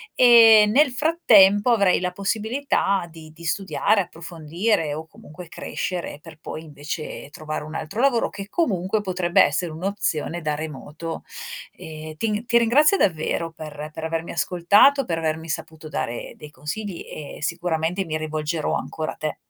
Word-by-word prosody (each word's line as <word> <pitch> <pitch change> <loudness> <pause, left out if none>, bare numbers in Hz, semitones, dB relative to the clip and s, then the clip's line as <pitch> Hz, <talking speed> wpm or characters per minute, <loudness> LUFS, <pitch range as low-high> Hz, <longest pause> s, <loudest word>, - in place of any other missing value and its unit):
e 230 -3 +8
nel 295 +2 +5
frattempo 240 - +5
avrei 200 -5 +4
la 180 0 -2
possibilità 210 -1 -1
di 160 -1 -13
di 170 +1 -15
studiare, 195 +4 +1
approfondire, 165 0 -2
o 160 - -6
comunque 160 +2 -13
crescere 175 -2 -4
per 160 -1 -14
poi 160 - -7
invece 150 0 -7
trovare 155 0 -5
un 155 +1 -9
altro 165 +10 -3
lavoro, 260 -4 +2
che 200 +1 -8
comunque, 205 - 0
potrebbe 180 -3 +3
essere 165 +2 0
un'opzione 175 -2 -2
da 150 -1 -1
remoto. 155 +2 -6 0.5
Ehm 155 0 -9
ti 215 +4 -1
ti 235 -1 +3
ringrazio 290 - +4
davvero 165 -1 0
per 155 -1 -8
per 160 - -7
avermi 165 +1 -3
ascoltato, 205 +11 +4
per 165 -5 -2
avermi 160 0 -2
saputo 160 0 -6
dare 120 -5 -4
dei 150 -1 -11
consigli 170 +5 -6
e 145 -2 -8
sicuramente 170 +2 -1
mi 155 -2 -2
rivolgerò 155 0 -2
ancora 155 -1 -3
a - - -17
te. 155 -1 -4
170 Hz, 150 wpm, -23 LUFS, 155-205 Hz, 0.5 s, e